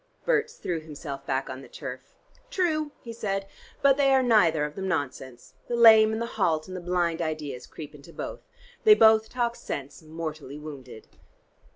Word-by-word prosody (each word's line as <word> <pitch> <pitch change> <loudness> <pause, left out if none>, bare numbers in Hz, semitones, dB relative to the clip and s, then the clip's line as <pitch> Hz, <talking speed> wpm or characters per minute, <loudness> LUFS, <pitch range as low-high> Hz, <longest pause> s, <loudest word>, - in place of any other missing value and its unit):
Berts 475 -2 +1
threw 175 - -3
himself 145 -3 -8
back 135 0 -1
on 130 +1 -7
the - - -12
turf. 130 -3 -9 0.3
"True," 310 -8 0
he 230 - -7
said. 195 -3 -2 0.4
"But 275 -1 +5
they 275 -1 +4
are 260 - +4
neither 170 -11 +4
of 150 - -6
them 190 +2 -4
nonsense. 135 -7 -4
The 240 - -1
lame 220 -2 +8
and 220 - -2
the 235 - -1 0.2
halt 155 -3 +1
and 185 - -7
the 185 - -5
blind 175 -1 0
ideas 150 -6 -4
creep 150 -2 -10
into 150 +3 -14
both. - - -6 0.4
They 430 -1 +8
both 220 - +5
talk 240 -1 -1
sense 140 - -6
mortally 155 -3 -7
wounded." 140 -7 -10
165 Hz, 180 wpm, -27 LUFS, 145-225 Hz, 0.4 s, lame